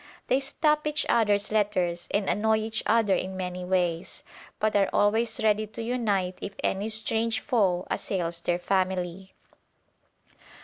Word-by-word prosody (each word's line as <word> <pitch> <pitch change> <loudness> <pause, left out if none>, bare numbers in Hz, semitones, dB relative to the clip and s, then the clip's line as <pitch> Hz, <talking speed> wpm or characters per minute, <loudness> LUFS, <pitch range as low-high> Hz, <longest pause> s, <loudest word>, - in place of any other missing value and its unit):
They 260 - +4
stop 300 +2 0
each 300 0 +1
other's 205 -3 +2
letters 185 -5 0
and 200 -1 0
annoy 220 +1 +2
each 220 0 -2
other 220 -3 +3
in 190 0 -2
many 180 -1 -4
ways, 180 -2 -1 0.3
but 215 -1 0
are 200 -1 +3
always 220 +2 +2
ready 215 0 +2
to 225 +2 -6
unite 205 -7 -1
if 200 - -6
any 200 +3 0
strange 225 +1 +1
foe 190 -9 +1
assails 170 -3 -2
their 175 0 0
family. 185 0 -2
205 Hz, 140 wpm, -27 LUFS, 185-220 Hz, 0.3 s, They